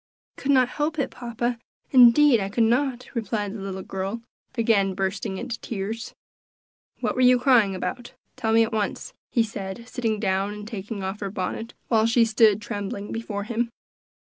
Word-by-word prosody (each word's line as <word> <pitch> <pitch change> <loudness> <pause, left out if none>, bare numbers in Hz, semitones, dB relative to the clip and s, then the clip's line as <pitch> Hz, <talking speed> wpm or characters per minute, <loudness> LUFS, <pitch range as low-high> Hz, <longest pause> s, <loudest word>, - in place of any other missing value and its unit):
"I - - -13
could 280 - +1
not 255 -2 +5
help 300 +4 -2
it, 275 -3 -1
papa; 240 0 -3 0.3
indeed 250 +1 +7
I 195 -1 -2
could 225 +3 +2
not," 250 +2 +1
replied 210 -3 -2
the 215 - -7
little 190 -1 -5
girl, 195 +4 -4 0.3
again 200 -4 +2
bursting 190 0 -2
into 235 +1 -5
tears. 225 +2 -5 0.9
"What - - 0
were 255 - -1
you 250 0 +6
crying 240 -6 +4
about? 245 +6 -5 0.2
tell 220 - -1
me 225 0 +6
at 225 - -3
once," 210 -2 -2 0.2
he 235 - +2
said, 215 +1 -6
sitting 225 -4 -2
down 195 0 0
and 210 0 -8
taking 205 -2 -5
off 190 +2 -4
her 200 - -3
bonnet, 195 +4 -4
while 225 -1 +3
she 230 0 +4
stood 215 -2 +4
trembling 205 -1 -5
before 215 -3 -4
him. 235 +2 -1
225 Hz, 175 wpm, -25 LUFS, 200-240 Hz, 0.9 s, indeed